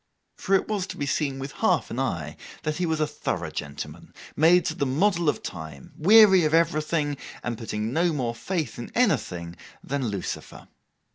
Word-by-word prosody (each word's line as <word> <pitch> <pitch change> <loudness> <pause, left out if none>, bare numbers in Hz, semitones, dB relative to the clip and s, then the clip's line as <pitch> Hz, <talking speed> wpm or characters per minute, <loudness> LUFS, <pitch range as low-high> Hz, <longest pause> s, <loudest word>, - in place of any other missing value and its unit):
For 195 - +1
it 190 - +1
was 205 -3 -2
to - - -7
be 145 - -2
seen 140 -1 -1
with 135 +1 -5
half - - +1
an - - -3
eye - - -2 0.3
that 155 0 -2
he 180 -1 0
was 160 -1 0
a 155 - +3
thorough - - -3
gentleman, 70 0 -7 0.2
made 170 +3 +5
to - - -1
the 140 - -1
model 170 +4 +2
of - - +1
the - - -14
time; 80 -5 -8
weary 195 +1 +7
of 155 +1 +3
everything, 155 -2 +1 0.3
and 120 -1 -2
putting 110 +1 -4
no 170 +3 +2
more 125 -6 -1
faith 140 - -3
in 120 - -7
anything 95 - 0 0.3
than 135 -2 -2
Lucifer. 100 -4 -5
150 Hz, 190 wpm, -25 LUFS, 120-175 Hz, 0.3 s, weary